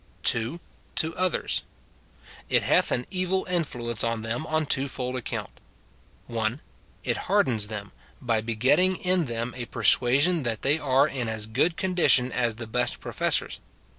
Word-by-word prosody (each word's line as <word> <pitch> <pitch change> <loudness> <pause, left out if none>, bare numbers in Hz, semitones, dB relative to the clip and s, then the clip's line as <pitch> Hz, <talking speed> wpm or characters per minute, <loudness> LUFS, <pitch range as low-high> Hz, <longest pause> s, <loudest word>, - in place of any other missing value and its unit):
2. 120 +9 +2 0.4
To 160 0 +2
others. 185 -2 0 0.9
It - - +2
hath - - +2
an 125 - -1
evil 185 0 -1
influence 125 - -2
on 115 -1 -1
them 120 +8 -3
on 155 0 0
a - - -5
twofold 130 -2 +1
account: 125 - -5 0.5
— - - -32 0.2
(1.) 115 +2 -2 0.4
It - - 0
hardens 110 -5 +2
them, 105 -2 -7 0.3
by 115 -3 0
begetting 130 +12 +2
in 180 -2 0
them 120 0 -4
a 120 -2 -6
persua 120 +3 +4
sion 170 +2 +2
that 115 -5 -3
they 145 +3 +2
are 140 0 +3
in 125 -6 -3
as 110 -1 -3
good 135 +10 0
condition 175 -9 +3
as 120 -3 0
the 115 +1 -7
best 120 +2 0
pro - - -7
fessors. - - 0
125 Hz, 165 wpm, -26 LUFS, 115-160 Hz, 0.9 s, persua